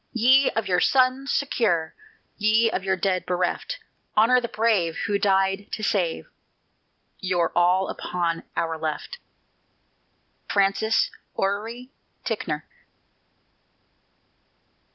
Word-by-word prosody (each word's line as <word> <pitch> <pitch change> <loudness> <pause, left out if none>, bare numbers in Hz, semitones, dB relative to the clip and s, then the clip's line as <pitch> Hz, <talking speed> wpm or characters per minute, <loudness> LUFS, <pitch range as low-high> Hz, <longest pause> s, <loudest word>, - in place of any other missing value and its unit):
Ye 260 +4 +5
of 225 - 0
your 180 -1 +2
sons 260 +4 +2
secure, 190 - 0 0.4
Ye 220 +1 +3
of 190 - -2
your 190 0 +1
dead 185 0 0
bereft 180 - -1 0.4
Honor 245 +4 +5
the 235 - -3
brave 210 -7 +1
Who 200 0 0
died 195 0 +1
to 215 - -4
save 175 - 0 0.9
Your 180 -2 0
all 180 +2 +3
upon 170 -2 -2 0.2
"Our 165 -1 -1
Left." 155 - -4 1.3
FRANCIS 200 +2 +2 0.2
ORRERY 225 +6 -3 0.3
TICKNOR. - - -3
200 Hz, 100 wpm, -24 LUFS, 180-230 Hz, 1.3 s, Ye